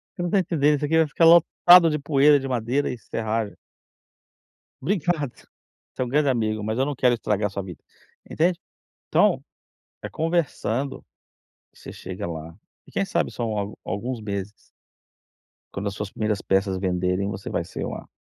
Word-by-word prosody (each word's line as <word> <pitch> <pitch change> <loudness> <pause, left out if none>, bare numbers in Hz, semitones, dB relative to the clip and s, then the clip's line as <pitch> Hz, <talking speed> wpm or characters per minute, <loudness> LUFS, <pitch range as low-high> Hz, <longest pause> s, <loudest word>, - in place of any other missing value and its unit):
Você 175 - -5
não 175 - -1
está 200 - +2
entendendo, 150 -5 +2
isso 150 +1 -2
aqui 160 +2 0
vai 160 -1 +4
ficar 165 +3 +2
lotado 170 +1 +7
de 150 - 0
poeira 145 0 +4
de 135 - -5
madeira 125 +3 0
e 125 - -6
serragem". 110 0 -3 1.3
"Obrigado, 170 - -1 0.6
você - - -5
é - - +1
um - - -6
grande 145 +1 +2
amigo, 110 -4 0
mas 110 +2 -2
eu 135 - +3
não 145 -1 -3
quero 125 -1 +3
estragar 105 -3 0
a - - -8
sua 100 0 -4
vida". 90 -4 -10 0.5
Entende? 170 +2 +1 0.5
Então - - +3 0.6
é - - -4
conversando 145 -6 -2 0.7
que - - -22
você - - -9
chega 95 -1 -6
lá. 80 +1 -7 0.3
E - - -16
quem 195 - 0
sabe - - -1
são 110 -3 -3
al 100 +1 -4
alguns 120 +5 -4
meses. 100 -1 -4 1.2
Quando 100 +1 -4
as 100 - -3
suas 105 -1 -5
primeiras 105 -2 -1
peças 95 0 +1
venderem 90 +1 0
você 95 -1 -6
vai - - -1
ser - - -6
uma - - -6
120 Hz, 180 wpm, -24 LUFS, 100-150 Hz, 1.3 s, lotado